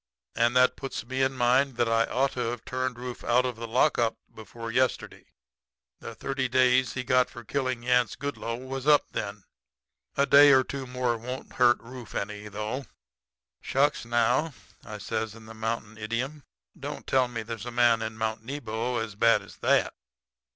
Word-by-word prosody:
And 120 +2 +2
that 125 0 +5
puts 135 -4 -5
me 130 +2 -2
in 130 0 +2
mind 130 +1 +2
that 120 - +2
I 115 0 +3
ought 135 +2 +1
to - - -7
have 120 -1 -6
turned 130 -1 -2
Rufe 125 0 -7
out 125 +2 +3
of 125 -2 -2
the 115 +1 -6
lockup 120 -1 +2 0.2
before 115 +2 -8
yesterday. 130 +2 -1 0.7
The - - -8
thirty 135 -1 -2
days 130 0 +3
he 125 - -3
got 125 0 +3
for 120 - -10
killin' 130 0 -2
Yance 125 -1 +2
Goodloe 140 -5 -4
was 135 +1 -5
up 150 -1 +4
then. 100 -1 -4 0.7
A 140 - +4
day 145 +1 +8
or 130 0 +6
two 135 0 -6
more 125 -2 -1
won't 125 +3 -7
hurt 120 -1 +4
Rufe 125 0 -10
any, 105 +1 -4
though.' 105 +6 -4 0.7
"'Shucks, 145 +2 +1
now,' 120 +6 +1 0.4
says 110 +1 -3
I, - - -11
in 110 - -14
the 110 - -10
mountain 110 -1 -4
idiom, 125 +7 -3 0.3
'don't - - -7
tell 130 -1 +2
me 115 -2 -5
there's 115 +2 -6
a - - -2
man 120 -1 +3
in 110 0 -4
Mount 110 0 -2
Nebo 120 -2 -3
as 110 -2 -3
bad 115 +3 +3
as - - -14
that.' - - +2
120 Hz, 180 wpm, -27 LUFS, 115-130 Hz, 0.7 s, day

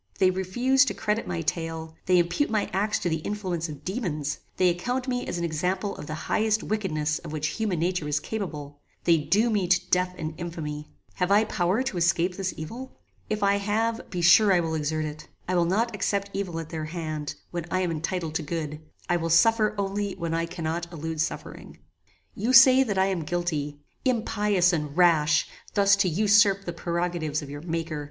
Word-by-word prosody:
"They 185 -1 +4
refuse 240 +9 +2
to - - -2
credit 210 +1 -1
my 175 -2 -2
tale; 165 0 -3
they 180 -1 +5
impute 175 +11 +1
my 215 -2 -1
acts 210 +2 +1
to - - -2
the 160 -1 +1
influence 180 -3 -3
of 145 0 -9
daemons; 165 - -2 0.2
they 185 -1 +4
account 245 +9 -2
me 250 -1 -2
an 170 - -3
example 180 +5 -1
of - - -9
the 155 - -4
highest 220 0 +1
wickedness 155 -8 -1
of - - -9
which 155 0 -1
human 210 -5 0
nature 175 -1 -1
is 150 0 +1
capable; 150 -8 -6 0.2
they 165 -2 +4
doom 215 +9 +2
me 195 -4 +1
to 180 +1 +2
death 180 0 +2
and 155 0 -4
infamy. 155 -3 -5 0.3
Have 180 -1 0
I 205 +2 +5
power 190 +3 0
to 265 -8 -3
escape 175 +1 +2
this 190 -1 -2
evil? 235 +12 -8 0.3
If 215 -1 -1
I 200 0 +4
have, 225 +3 -1
be 175 -2 -3
sure 200 +4 +7
I 180 - +5
will 165 -1 -1
exert 155 0 -1
it. 155 0 -7 0.2
I 185 - -1
will 175 -1 +3
not 220 +7 +1
accept 200 0 -1
evil 185 -4 -3
at 160 -1 -7
their 160 -2 -4
hand, 155 -3 -4 0.2
when 175 -2 -4
I 185 - 0
am 180 -2 0
entitled 165 0 -3
to 160 - -1
good; 155 -1 -4 0.3
I 175 - +2
will 165 -1 -2
suffer 215 +6 +4
only 200 0 -2
when 170 -1 -3
I 165 0 0
cannot 170 0 -4
elude 160 -1 -3
suffering. 165 - -5 0.6
"You 230 +6 -1
say 260 +1 +9
that 210 -7 0
I 190 - +4
am 190 -3 -1
guilty. 155 -3 -2 0.3
Impious 210 -7 +2
and 150 -2 -3
rash! 165 -3 +4 0.3
thus 200 -1 +5
to 195 -2 +2
usurp 200 +2 +4
the 175 - -4
prerogatives 170 -3 -2
of 140 - -9
your 145 0 -7
Maker! 165 -2 -3
175 Hz, 200 wpm, -26 LUFS, 160-200 Hz, 0.6 s, say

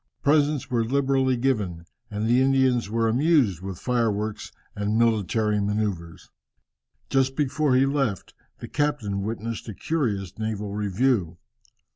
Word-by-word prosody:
Presents 145 -2 +2
were 120 -2 +2
liberally 135 +1 +1
given, 105 -10 -1 0.2
and 105 0 -3
the 120 +3 +3
Indians 130 -4 +2
were 115 +1 +1
amused 125 - +2
with 95 -2 -6
fireworks 110 -3 -1 0.2
and 105 +2 -1
military 110 -2 +1
manoeuvres. 100 -5 -3 0.8
Just 135 0 +2
before 145 -1 +1
he 130 +1 +4
left, 135 -8 -1 0.2
the - - -8
captain 140 -10 -1
witnessed 115 +2 -4
a 105 - -7
curious 105 - -2
naval 105 -2 -3
review. 105 -3 0
115 Hz, 125 wpm, -25 LUFS, 105-135 Hz, 0.8 s, he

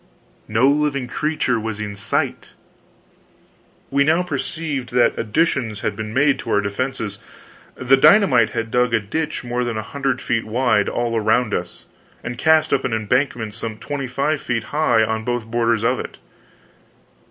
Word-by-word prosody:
No 110 +5 +3
living 140 -2 +1
creature 150 -4 -1
was 110 -1 -4
in 105 -1 -5
sight! 100 - -2 1.4
We 140 +1 +3
now 160 +5 +2
perceived 160 -7 -4
that 120 -1 +3
additions 115 -2 0
had 105 - -2
been 110 0 -5
made 140 +3 +2
to - - -7
our 105 - +3
defenses. 105 0 -3 0.6
The 130 +1 +3
dynamite 135 - +5
had 115 0 -4
dug 125 -1 +2
a - - +3
ditch 155 +11 -3
more 120 0 -2
than 120 -2 -3
a 110 - -3
hundred 135 +3 -2
feet 115 -2 -1
wide, 115 -2 +2
all 120 -1 -1
around 110 0 +1
us, 85 0 -4 0.4
and 120 0 -4
cast 160 0 +3
up 135 - +1
an 120 - -1
embankment 110 0 0
some 115 0 -6
twenty 140 +2 -4
five 140 +4 -1
feet 115 -2 -2
high 125 -7 +3
on 110 0 -1
both 120 -1 -2
borders 115 -1 0
of - - +1
it. - - -7
120 Hz, 165 wpm, -20 LUFS, 110-140 Hz, 1.4 s, dynamite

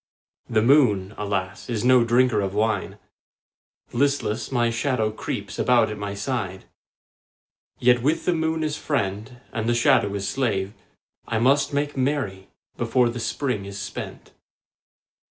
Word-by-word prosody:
The 110 -1 +2
moon, 110 -8 +4
alas, 100 0 -3
is 115 -1 -2
no 125 -1 +6
drinker 120 -2 +3
of 100 0 -3
wine; 110 +1 0 1.0
Listless, 140 -4 0
my 120 -2 +2
shadow 115 -2 0
creeps 110 - -5
about 120 -3 +3
at 105 - -5
my 100 0 -4
side. 100 -5 -3 1.1
Yet 125 0 +4
with 155 +6 0
the 180 - +3
moon 160 -1 -1
as 155 -1 -1
friend 110 -5 -3 0.2
and 110 -1 -1
the 120 - +2
shadow 100 -3 +3
as 100 0 -3
slave 100 -3 -1 0.5
I 115 - -1
must 135 +6 +3
make 145 +1 -1
merry 130 -9 -1 0.3
before 120 +1 +2
the 120 +1 -5
Spring 115 -2 -2
is 100 0 -7
spent. - - -7
115 Hz, 140 wpm, -24 LUFS, 105-130 Hz, 1.1 s, no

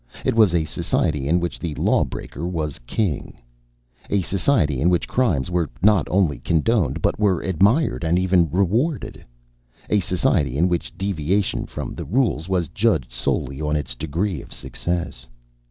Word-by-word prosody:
It - - +2
was 110 -6 +4
a 80 -2 +2
society 75 -2 -1
in 85 +4 +3
which 85 0 -3
the 80 -4 -4
lawbreaker 80 +7 -1
was 80 -5 -3
king; 95 - -2 0.7
a 100 -2 +1
society 85 - +1
in 85 - +4
which 90 -1 +1
crimes 90 - 0
were 85 -3 0
not 105 -6 +4
only 85 -9 +1
condoned 80 - +1
but - - +1
were 100 -5 +2
admired 100 - +2
and 85 +2 +2
even 90 -2 +3
rewarded; 110 - 0 0.7
a 105 - +4
society 90 - 0
in 85 +4 +3
which 90 -1 -3
deviation 95 0 -1
from - - -6
the - - -6
rules 105 - 0
was 90 -3 +1
judged 95 - +1
solely 65 +3 -2
on 75 0 0
its 75 - -2
degree 80 +5 -2
of - - -15
success. 70 0 -4
85 Hz, 155 wpm, -22 LUFS, 75-100 Hz, 0.7 s, was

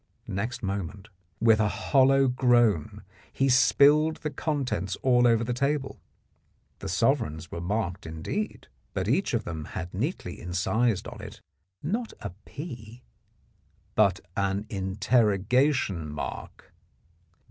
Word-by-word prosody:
Next 115 +6 -4
moment 100 +1 -4 0.3
with 110 -1 +5
a 105 - +3
hollow 135 +7 +3
groan 120 - +2 0.3
he 135 0 +1
spilled 145 +5 +5
the 150 - -4
contents 130 - -2
all 125 -2 +5
over 115 -1 +3
the 120 +2 -1
table. 140 +2 -1 0.8
The - - -5
sovereigns 85 - 0
were 85 - -5
marked 95 -1 -2
indeed, 80 - -4 0.3
but - - -1
each 195 -10 +1
of 110 - -1
them 80 -3 -5
had 90 -1 -5
neatly 110 - -3
incised 100 +4 0
on 120 -3 -9
it, 105 -1 -9 0.4
not 220 +9 -2
a 100 - -6
"P 120 -6 -9 0.5
" - - -39 0.3
but 100 -4 +3 0.2
an 100 +1 0
interrogation 105 - +1
mark. 75 -1 -7
110 Hz, 125 wpm, -27 LUFS, 95-130 Hz, 0.8 s, with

